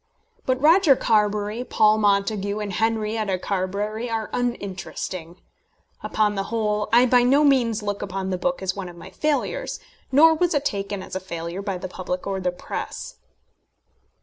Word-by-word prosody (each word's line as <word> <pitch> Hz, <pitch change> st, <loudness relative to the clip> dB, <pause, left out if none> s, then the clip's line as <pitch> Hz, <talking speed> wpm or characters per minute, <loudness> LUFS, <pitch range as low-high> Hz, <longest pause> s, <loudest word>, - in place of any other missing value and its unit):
But 255 Hz, 0 st, +1 dB
Roger 320 Hz, 0 st, +6 dB
Carbury, 210 Hz, 0 st, +1 dB
Paul 215 Hz, -3 st, +3 dB
Montague, 200 Hz, 0 st, +1 dB
and 210 Hz, -2 st, -4 dB
Henrietta 220 Hz, -2 st, 0 dB
Carbury 205 Hz, +5 st, -2 dB
are 225 Hz, -1 st, -3 dB
uninteresting. 185 Hz, -6 st, -4 dB, 0.6 s
Upon 210 Hz, -1 st, +1 dB
the 195 Hz, -1 st, -2 dB
whole, 210 Hz, -2 st, -1 dB
I 240 Hz, +2 st, +6 dB
by 250 Hz, 0 st, +5 dB
no 270 Hz, +5 st, +4 dB
means 240 Hz, -6 st, +3 dB
look 205 Hz, -1 st, -3 dB
upon 190 Hz, -1 st, -3 dB
the 185 Hz, -, 0 dB
book 265 Hz, -3 st, -1 dB
as 190 Hz, 0 st, -1 dB
one 195 Hz, -3 st, -5 dB
of 175 Hz, -, -12 dB
my 165 Hz, -, -11 dB
failures; 300 Hz, -1 st, -1 dB, 0.3 s
nor 320 Hz, +4 st, +7 dB
was 335 Hz, 0 st, +1 dB
it 290 Hz, 0 st, 0 dB
taken 200 Hz, -3 st, -2 dB
as -, -, -8 dB
a -, -, -1 dB
failure 170 Hz, 0 st, -5 dB
by 195 Hz, -2 st, -3 dB
the 185 Hz, -, -5 dB
public 180 Hz, 0 st, -5 dB
or 195 Hz, -1 st, -2 dB
the 180 Hz, -1 st, 0 dB
press. 180 Hz, -, -6 dB
210 Hz, 165 wpm, -23 LUFS, 190-240 Hz, 0.6 s, nor